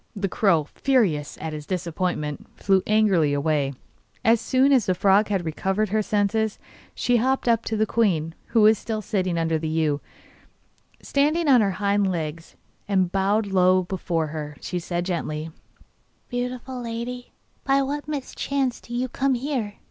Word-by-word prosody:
The 200 -1 -1
crow, 180 -5 +2
furious 200 - +1
at 160 0 -5
his 150 -1 -7
disappointment, 175 -4 -3
flew 195 -1 +3
angrily 195 -9 +3
away. 145 -1 0 0.5
As 225 0 +4
soon 265 +3 +3
as 255 -6 +4
the 185 - +2
frog 200 +3 +4
had 195 -4 -1
recovered 190 +6 -1
her 215 +2 +1
senses 210 +1 0 0.4
she 245 -1 +2
hopped 260 +2 0
up 230 -1 +3
to 220 - -2
the 215 - +3
queen, 175 -9 +1
who 230 - +2
was 215 0 +6
still 220 -2 -4
sitting 185 -5 -1
under 165 -1 0
the 160 - -3
yew. 155 -2 0 1.0
Standing 300 +4 +1
on 255 -4 +6
her 200 -2 +1
hind 200 -1 +1
legs, 165 -1 -5 0.3
and 190 -3 +1
bowing 200 +2 +1
low 185 0 +4
before 175 -3 -2
her, 150 -1 -6
she 180 - -4
said 175 0 -3
gently: 160 -3 -3 0.8
'Beautiful 250 +1 -4
lady, 240 +1 -5 0.3
by 275 0 +3
what 290 +2 -4
mischance 275 -2 -2
do 240 - -8
you 250 +1 0
come 265 +1 0
here? 245 -5 -3
200 Hz, 160 wpm, -24 LUFS, 170-240 Hz, 1.0 s, was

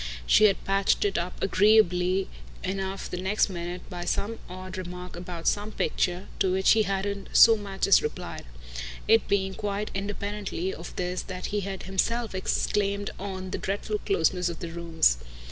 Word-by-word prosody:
She 215 - +6
had 200 -2 +3
patched 195 +1 +2
it 200 - 0
up 175 +1 -4
agreeably 190 -2 +4 0.4
enough 195 0 -3
the 180 - -5
next 205 +3 +2
minute 175 0 -5
by 175 -2 -6
some 220 +5 -2
odd 185 +1 -7
remark 180 0 -7
about 175 -1 -6
some 210 +1 +1
picture, 180 -2 -1
to 190 -2 +2
which 190 +1 +4
he 220 - +5
hadn't 200 0 -2
so 225 0 +9
much 200 -2 -2
as 195 - +6
replied; 150 - -5 0.6
it 225 0 +5
being 190 -1 +1
quite 205 0 -3
independently 200 -2 -3
of 170 - -9
this 180 0 -2
that 185 -1 -6
he 210 - +2
had 195 -1 -5
himself 225 +4 -1
exclaimed 200 +1 0
on 190 -1 -5
the - - -2
dreadful 205 +2 -2
closeness 180 -1 +1
of 170 - -5
the 170 - -6
rooms. 165 - +2
190 Hz, 165 wpm, -27 LUFS, 180-200 Hz, 0.6 s, so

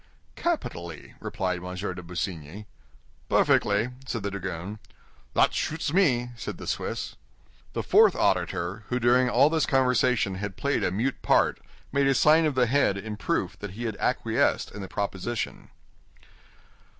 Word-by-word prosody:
"Capitally," 85 - -3
replied 90 -2 -3
M. 90 0 -6
de 90 -1 -4
Busigny. 90 +1 -5 0.6
"Perfectly," 105 +4 +3 0.2
said 115 -5 -3
the 100 - -2
dragoon. 95 +1 -5 0.6
"That - - +4
shoots 160 -1 -2
me," 125 -10 +3
said 115 - -6
the - - -8
Swiss. - - -3 0.6
The - - -2
fourth - - +5
auditor, 95 +4 0
who 125 - 0
during 125 +1 +4
all 140 - +5
this 160 -2 +1
conversation 125 -5 +2
had 100 -2 -5
played 140 0 0
a - - +2
mute 115 +9 -1
part, - - +3 0.3
made 140 0 +2
a 135 - +3
sign 155 +4 +5
of 145 - -2
the 125 -1 +4
head 125 -5 +2
in 105 +2 -5
proof 105 - -2
that 105 -2 -6
he 120 - -4
acquiesced 110 - 0
in 105 - -8
the 95 - -6
proposition. 100 +4 -4
110 Hz, 150 wpm, -27 LUFS, 95-130 Hz, 0.6 s, fourth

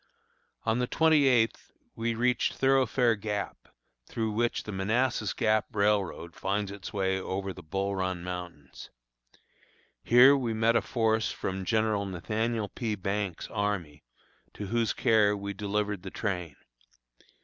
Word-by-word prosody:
On 115 +1 +1
the 125 - 0
twenty 155 -2 +4
eighth 120 -3 +2 0.2
we 115 0 -1
reached 125 +1 +1
Thoroughfare 130 -3 +3
Gap, 105 -1 -4 0.4
through 110 -2 -2
which 120 +2 0
the 105 - -6
Manassas 110 +6 0
Gap 110 -3 +1
railroad 100 -5 0
finds 100 +1 -2
its 100 -1 -8
way 95 -1 0
over 95 +1 -3
the - - -11
Bull 100 +5 -2
Run 95 -2 -2
mountains. 90 -6 -8 1.1
Here 125 +4 +7
we 120 -5 -1
met 115 +1 +3
a - - +4
force 110 -2 0
from 95 0 -4
General 110 -2 +1
Nathaniel 110 +4 -2
P. 110 -3 -3
Banks' 100 -2 -3
army, 100 -8 -2 0.5
to 105 - -5
whose 115 +2 0
care 105 -4 +3
we 100 0 -5
delivered 105 -1 -2
the 95 - -7
train. 90 -7 -3
105 Hz, 140 wpm, -29 LUFS, 95-115 Hz, 1.1 s, Here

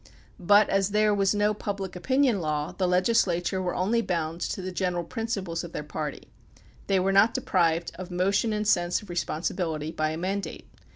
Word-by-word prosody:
But 205 +3 +5
as 195 0 +1
there 210 0 +3
was 200 0 +2
no 205 +1 +2
Public 200 -3 -5
Opinion 260 +1 +2
Law 150 -1 -2
the 185 - -1
legislature 185 -1 +2
were 180 -1 -2
only 215 +6 +1
bound 170 -4 -2
to - - -2
the 185 0 -4
general 180 -1 -1
principles 195 -5 -3
of 170 - -9
their - - -4
party; 150 -1 -5 0.6
they 195 -1 +3
were 190 +1 +1
not 200 +4 +4
deprived 170 -9 +1
of 185 0 -6
motion 195 +5 +1
and 210 0 -1
sense 175 -1 +2
of 200 - -10
responsibility 160 -2 -2
by 155 -1 -1
a 155 - -4
mandate. 195 +3 -4
185 Hz, 180 wpm, -27 LUFS, 170-205 Hz, 0.6 s, But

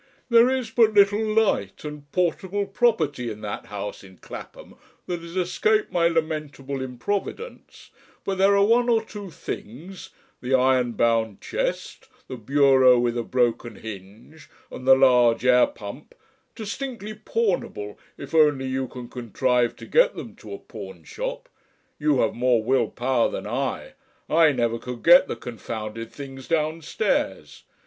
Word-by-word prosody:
"There 235 +1 +6
is 260 -4 -2
but 225 -2 +3
little 205 +1 +5
light, 215 - 0
and 150 -1 -8
portable 190 +3 -1
property 195 - 0
in 105 -1 -8
that 105 -1 -6
house 105 0 -6
in 95 -2 -15
Clapham - - -11 0.3
that 175 -1 -3
has 170 +1 -10
escaped 210 +4 +1
my 170 -1 +3
lamentable 150 -4 -3
improvidence, 195 - -5 0.3
but 195 -1 -3
there 200 +1 +5
are 200 - +5
one 240 +3 +3
or 225 -1 +3
two 205 -3 -8
things 165 - -8 0.3
the 130 +1 +1
iron 130 -2 +2
bound 115 -3 +1
chest, - - -4 0.2
the - - -6
bureau 130 +1 +4
with 120 0 0
a 120 - 0
broken 120 -1 -1
hinge, 110 +9 -11 0.2
and 130 - -8
the 135 - +9
large 125 -3 +4
air 125 -1 +5
pump 105 +7 -10 0.4
distinctly 225 -1 -5
pawnable 200 - -2 0.2
if 140 - -10
only 150 -4 +4
you 130 0 -2
can 125 -1 -9
contrive 125 0 0
to - - -11
get - - +3
them - - -8
to - - -12
a 400 - -5
pawnshop. - - -7 0.5
You 150 -3 +2
have - - +1
more 120 -2 +2
Will 130 +3 +2
power 125 -1 +1
than - - -5
I 135 - -3 0.3
I 160 -1 +5
never 120 -3 -1
could 125 -1 -8
get 175 +2 +7
the - - -3
confounded 115 -1 -7
things 135 -2 -9
downstairs. 155 - -1
140 Hz, 150 wpm, -24 LUFS, 120-200 Hz, 0.5 s, the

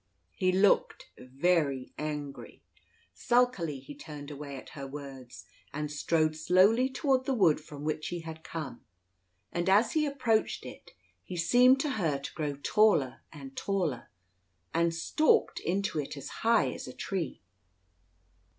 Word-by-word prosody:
He 185 0 +1
looked 195 +2 +2
very 135 0 0
angry. 150 -2 -6 0.5
Sulkily 240 - +1
he 135 +2 -10
turned 145 0 -9
away 140 -1 -7
at - - -11
her 140 -2 -7
words, 135 -3 -9 0.3
and 150 0 -4
strode 155 +1 +1
slowly 190 +10 +4
toward 265 -1 +1
the 270 - 0
wood 165 -9 +4
from 145 -1 -10
which 155 0 -2
he 175 -1 -4
had 160 -1 -9
come; 155 -7 -6 0.7
and 175 +2 -1
as 210 +4 +4
he 305 -1 +1
approached 250 -6 0
it, - - -11 0.3
he 180 - -7
seemed 250 +10 +5
to 295 - -1
her 155 -5 +1
to 140 - -8
grow 150 -3 -2
taller 205 -12 +3
and 135 -3 -10
taller, 180 -11 -2 0.6
and 170 0 +2
stalked 310 - +2
into 190 -3 -1
it 145 0 -5
as 140 0 -7
high 230 0 +3
as - - -7
a - - -8
tree. 180 -8 -4
165 Hz, 145 wpm, -30 LUFS, 145-205 Hz, 0.7 s, seemed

